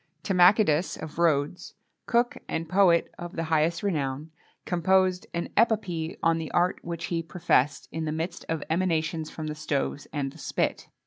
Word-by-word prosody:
Timachidas 180 -3 +4
of 160 +1 -8
Rhodes, 155 0 +1 0.3
cook 240 +1 +2
and 165 0 -3
poet 180 -1 +3
of 175 0 -7
the 165 - -1
highest 160 +3 +2
renown, 150 -5 -2 0.3
composed 185 +1 +2
an 170 - -3
epopee 190 -8 +1
on 165 0 +3
the 160 - -5
art 175 +1 +2
which 170 0 -5
he 165 - +1
professed, 150 -4 +1
in 160 0 -3
the 155 - -2
midst 165 +3 -4
of 160 -2 -1
emanations 160 -2 0
from 160 - -6
the 155 - -3
stoves 145 -1 -2
and 140 -2 -2
the 160 - -15
spit. - - -2
165 Hz, 165 wpm, -27 LUFS, 155-180 Hz, 0.3 s, Timachidas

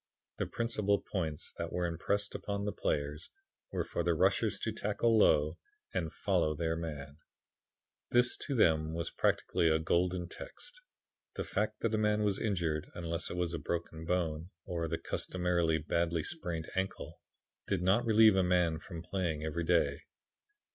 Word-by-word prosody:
The - - -1
principal 105 -4 +1
points 80 -6 -3
that 85 0 -3
were 90 0 0
impressed 100 +5 -1
upon 100 0 -3
the 105 - 0
players 75 -2 -2 0.4
were - - -1
for - - -3
the - - +2
rushers - - +2
to - - -1
tackle 115 -1 +1
low 80 -6 +4 0.3
and 85 -4 -1
follow 85 -6 +1
their 80 +1 0
man. 75 -3 -6 0.9
"This 120 0 +5
was - - -7
to 140 - -1
them 80 -6 +3 0.2
practically 85 - +2
a 80 - +4
golden 90 +2 +1
text. - - -9 0.5
The - - -2
fact 105 +1 -2
that 115 -1 0
a 110 - +2
man 105 0 +2
was 100 -2 +1
injured, 85 -7 -1
unless 85 -1 -1
it 90 - -5
was 90 -1 -1
a 85 - -2
broken 85 -1 -4
bone, 85 -1 -1 0.2
or 85 -2 -2
the 80 +1 -1
customary 85 -3 0
badly 85 +1 0
sprained 85 - -4
ankle, 95 0 -3 0.5
did 90 - 0
not 100 +6 +4
relieve 110 -2 +6
a 95 - +4
man 90 -3 +2
from 85 -2 -8
playing 85 -5 -2
every 80 +2 -2
day. 85 0 +2
85 Hz, 160 wpm, -33 LUFS, 80-100 Hz, 0.9 s, relieve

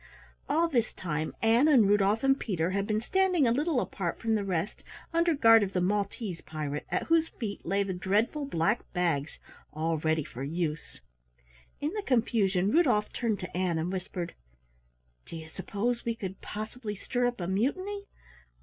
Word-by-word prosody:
All 325 +4 +3
this 240 -8 0
time 155 -3 -3
Ann 230 +6 +5
and 255 -9 +6
Rudolf 205 +2 +3
and 270 0 +4
Peter 180 -5 -1
had 200 +1 -1
been 215 0 0
standing 365 +2 +2
a 230 - +3
little 290 +3 +1
apart 180 -7 -3
from 225 -1 0
the 210 -2 +1
rest 185 0 -2 0.3
under 335 -1 +3
guard 225 -4 +7
of 195 -1 -1
the 180 - +1
Maltese 200 0 -1
pirate 150 -2 -5
at - - 0
whose 330 0 +2
feet 210 -5 -6
lay 200 +3 +2
the 195 -1 -3
dreadful 210 +11 0
black 210 -1 +1
bags 165 -5 0 0.3
all 160 +1 -1
ready 160 0 +1
for 125 -2 -9
use. 155 +1 -3 0.8
In 295 +2 -1
the 425 - -2
confusion 210 - +2
Rudolf 265 -10 +3
turned 225 -4 -1
to 180 - -7
Ann 180 -2 +1
and 165 +3 -1
whispered, 180 -2 -4 0.9
"Do - - -8
you 160 0 -9
suppose 205 +7 -2
we 230 -1 -1
could 190 -4 -6
possibly 215 0 -5
stir 245 +5 0
up 245 -2 -3
a 175 - -2
mutiny? 370 - -1
205 Hz, 175 wpm, -29 LUFS, 180-245 Hz, 0.9 s, guard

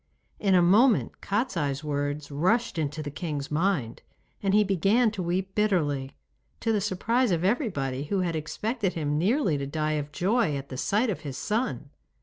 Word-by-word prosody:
In 195 -2 +3
a 175 - +5
moment 215 +7 +3
Kostiei's 170 - -1
words 145 0 -3
rushed 185 +7 +1
into 155 0 -2
the 145 - -5
king's 145 -2 -4
mind, 150 - 0 0.4
and 195 - +1
he 210 - +6
began 200 +5 +2
to 205 -3 -4
weep 185 +2 -2
bitterly, 150 -11 0 0.5
to 225 - +1
the 210 - +1
surprise 225 +5 +1
of 170 -2 0
everybody, 145 - 0
who 190 +5 0
had 170 -2 -1
expected 200 - -2
him 150 -2 -1
nearly 190 - +2
to 140 - -3
die 155 +1 -1
of 145 +1 -10
joy 190 -1 +1
at 140 0 -8
the 130 - -6
sight 215 - +1
of 180 - -4
his 145 -4 -6
son. 225 +5 -2
180 Hz, 175 wpm, -27 LUFS, 145-210 Hz, 0.5 s, he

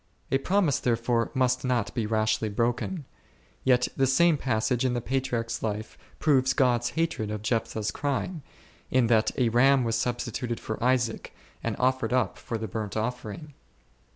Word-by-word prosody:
A 135 - +3
promise 180 -3 +2
therefore 115 0 +1
must 125 -1 +2
not 125 -5 0
be 115 -4 -1
rashly 110 0 +1
broken; 120 - -1 0.6
yet 125 -1 +3
the 135 - +2
same 165 +5 +4
passage 125 -1 0
in 125 -1 +1
the - - 0
Patriarch's 120 -2 -2
life 110 0 -3 0.2
proves 130 -4 +3
God's 120 -3 +2
hatred 165 -10 0
of 105 -1 -4
Jephthah's 110 -2 -1
crime, 145 +4 -2 0.5
in 130 -2 +3
that 110 -1 +3
a 125 -3 +3
ram 130 +3 +4
was 115 -1 0
substituted 120 0 -2
for 110 +1 -5
Isaac, 125 -2 0 0.3
and - - -1
offered 130 -2 +1
up 125 -7 0
for 115 - -4
the 110 0 -4
burnt 105 0 -4
offering. 125 +6 -4
120 Hz, 155 wpm, -27 LUFS, 115-130 Hz, 0.6 s, same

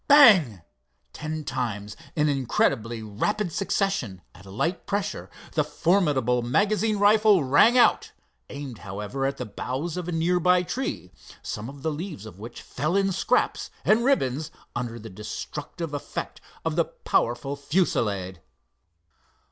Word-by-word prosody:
Bang! 195 - +7 0.5
ten 155 0 -4
times 105 -7 -3 0.2
in 150 -2 +2
incredibly 120 -4 0
rapid 175 - -1
succession 195 - -1
at 100 - -15
a - - -11
light 165 - -2
pressure 205 0 -2 0.2
the - - +2
formidable 145 - +2
magazine 210 - +1
rifle 205 -3 +5
rang 145 - +5
out, 245 - +4 0.4
aimed, 135 -5 -7
however, 105 +8 -3
at 140 - -3
the - - -4
boughs 130 - -4
of 180 -1 -4
a - - -2
nearby 180 +2 +3
tree, 180 - -4 0.3
some 110 +4 -5
of 140 0 -11
the 160 - 0
leaves 155 - -6
of 105 -3 -11
which 115 +3 -9
fell 155 +8 -2
in 195 0 +2
scraps 185 - 0 0.2
and 220 +2 +4
ribbands 155 - +1 0.3
under 120 -1 -3
the 115 0 -9
destructive 145 - -6
effect 145 - -5 0.2
of - - 0
the - - +3
powerful 120 +4 -1
fusillade. 105 - -1
145 Hz, 140 wpm, -26 LUFS, 115-185 Hz, 0.5 s, Bang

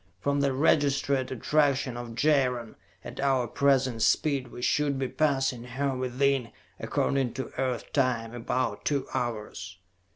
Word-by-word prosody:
From 140 +6 0
the 140 -1 +2
registered 140 -1 +2
attraction 140 -1 +1
of 120 -1 -7
Jaron, 125 -5 +1 0.3
at - - -9
our 135 -2 +2
present 130 -1 +1
speed, 140 +1 +2
we 120 +1 -9
should 145 0 +1
be 135 -1 -1
passing 135 -4 0
her 130 +2 -2
within, 130 0 0 0.3
according 135 -4 0
to 130 -2 -5
Earth 130 -3 -2
time, 120 -5 0
about 120 -2 -2
two 140 -3 0
hours. 105 -7 -4
130 Hz, 135 wpm, -28 LUFS, 120-140 Hz, 0.3 s, the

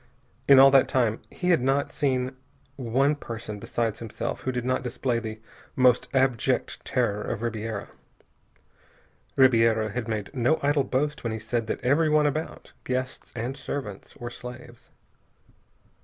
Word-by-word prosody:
In 140 - +8
all 135 +1 +9
that 135 -1 +6
time 115 -4 +1
he 180 -1 -1
had 165 - +4
not 135 +2 +1
seen 130 -2 -1 0.4
one 135 +3 +1
person 115 -6 -7
besides 115 +1 -2
himself 115 -2 -4
who 130 - -2
did 125 -1 -3
not 130 0 +1
display 125 -1 -1
the 110 -1 -6 0.4
most 125 -2 +4
abject 130 -4 +1
terror 105 0 0
of 110 - -4
Ribiera. 110 -2 -3 1.5
Ribiera 115 -4 +4
had 120 +2 -4
made 110 0 -3
no 130 +4 +2
idle 140 -1 +2
boast 145 +4 -1
when 115 -2 -2
he - - -3
said 115 +1 -2
that - - -3
everyone 150 +3 +3
about, 155 +2 -3
guests 130 0 -3
and 120 +3 -3
servants, 135 -7 -6
were 120 0 -6
slaves. 120 -1 -10
125 Hz, 145 wpm, -26 LUFS, 115-135 Hz, 1.5 s, all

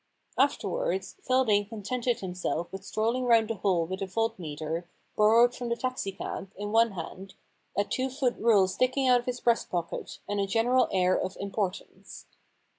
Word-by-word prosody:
Afterwards - - 0
Feldane 225 - +2
contented 235 +2 -2
himself 180 -2 -3
with 195 - -6
strolling 230 +4 -1
round 230 -2 +4
the 225 - -3
hole 180 -4 +1
with 190 +3 -5
a 195 - -2
voltmeter, 170 -6 -3 0.3
borrowed 230 +3 +5
from 245 -1 -5
the 235 - +1
taxi 255 -5 -3
cab, 195 0 -6
in 205 +1 -5
one 225 -1 +4
hand, 190 +2 -8 0.4
a 200 - +4
two 260 +5 -2
foot 255 -2 0
rule 210 -4 +5
sticking 255 +6 +1
out 250 -1 +6
of 240 - -9
his 250 0 -2
breast 235 -1 +2
pocket, 170 -2 -4
and 205 0 -1
a 200 - +1
general 235 +5 +3
air 185 -1 +3
of 185 - -3
importance. 200 -1 -5
215 Hz, 170 wpm, -28 LUFS, 190-245 Hz, 0.4 s, out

